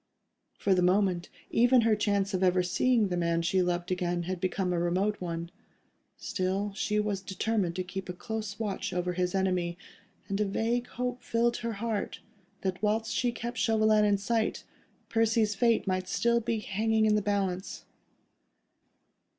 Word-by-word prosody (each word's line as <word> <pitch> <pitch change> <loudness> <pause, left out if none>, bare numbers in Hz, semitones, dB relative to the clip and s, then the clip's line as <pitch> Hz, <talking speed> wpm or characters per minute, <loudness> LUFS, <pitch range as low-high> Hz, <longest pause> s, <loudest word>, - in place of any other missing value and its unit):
For 200 - +2
the 180 - +3
moment, 180 -1 +2 0.2
even 245 +1 +5
her 225 -1 +3
chance 200 -1 0
of 185 - 0
ever 180 -1 +3
seeing 220 +3 +2
the 180 - -1
man 170 -1 +1
she 185 +2 +2
loved 175 0 -1
again, 175 -1 -1
had 180 0 -4
become 185 -1 0
a 175 - 0
remote 185 +5 0
one. 170 -1 -4 0.7
Still, 195 +2 -2
she 210 +1 0
was 210 -2 -1
determined 190 -2 -1
to 185 - -1
keep 185 +1 -6
a - - -2
close 210 +2 -5
watch 205 -4 -3
over 180 0 -1
his 180 +1 -1
enemy, 180 -2 0 0.5
and 200 +1 -1
a - - +3
vague 235 +5 -1
hope 250 0 -4
filled 235 +1 +1
her 230 -1 -3
heart, 220 -1 -3 0.4
that 185 -1 -2
whilst 220 +2 0
she 245 -1 +1
kept 235 0 -5
Chauvelin 215 -1 +3
in 205 -1 +3
sight, 220 +2 -1 0.4
Percy's 225 -1 +2
fate 230 +2 +2
might 185 -1 -1
still 235 0 +2
be 230 0 -1
hanging 220 +2 +1
in 215 - +4
the 210 - +3
balance. 195 -2 -2
200 Hz, 165 wpm, -29 LUFS, 180-220 Hz, 0.7 s, even